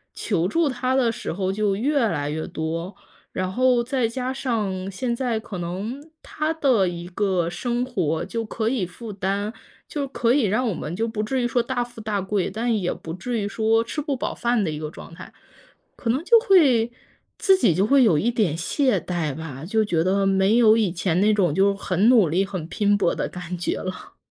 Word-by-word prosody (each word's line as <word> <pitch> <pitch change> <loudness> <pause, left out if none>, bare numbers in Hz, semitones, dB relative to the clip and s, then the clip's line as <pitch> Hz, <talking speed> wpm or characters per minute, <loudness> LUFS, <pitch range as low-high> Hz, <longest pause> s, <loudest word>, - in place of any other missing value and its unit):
求 175 -5 0
助 330 - +1
他 255 0 -1
的 245 -3 +3
时 - - -5
候 190 +2 -1
就 205 -1 0
越 280 +8 +1
来 145 -6 -2
越 155 +1 -3
多， 165 +4 -4 0.4
然 185 0 -2
后 250 0 +3
再 250 -1 0
加 255 +2 -3
上 210 -8 -2
现 235 +5 -2
在 235 -3 -1
可 205 -5 -7
能 215 - -5
他 310 +1 -2
的 255 - +2
一 175 0 -7
个 185 -3 0
生 240 +5 -2
活 170 - -1
就 225 +4 -3
可 220 +1 -2
以 220 -9 -1
负 210 +4 -9
担 200 +3 -2 0.3
就 285 -2 -3
可 240 -2 +1
以 285 - +3
让 230 +6 +1
我 - - -1
们 160 +1 -5
就 225 +3 -1
不 220 -2 -3
至 250 +3 -1
于 - - +2
说 240 0 +1
大 245 +1 -1
富 240 -2 -11
大 210 -2 -1
贵， 195 -1 -1
但 230 +3 -1
也 180 - 0
不 160 - -7
至 230 +6 -3
于 200 - -2
说 225 +2 +2
吃 300 +6 -4
不 285 -2 -2
饱 - - -3
饭 235 -3 0
的 160 - -1
一 150 - -5
个 155 - -4
状 165 - -12
态。 - - -11 0.6
可 230 - -4
能 265 +7 +1
就 465 +4 +7
会 275 - +4 0.5
自 385 - +4
己 215 - +3
就 195 +4 +2
会 275 +3 +5
有 180 -10 +4
一 240 +3 +1
点 205 -10 +1
懈 250 - +1
怠 165 -6 -3
吧， 155 -3 -7
就 220 +3 +1
觉 165 -5 +1
得 195 +2 +1
没 195 +3 +3
有 220 -2 +6
以 205 -6 +1
前 175 0 0
那 215 +1 +4
种 185 -7 +2
就 200 +1 +3
很 195 +2 +1
努 215 -10 +5
力 185 +5 +2
很 185 -5 -5
拼 205 +3 +1
搏 185 -4 +1
的 - - -2
感 180 0 -6
觉 175 - -2
了。 185 0 -7
210 Hz, 235 characters per minute, -23 LUFS, 185-245 Hz, 0.6 s, 就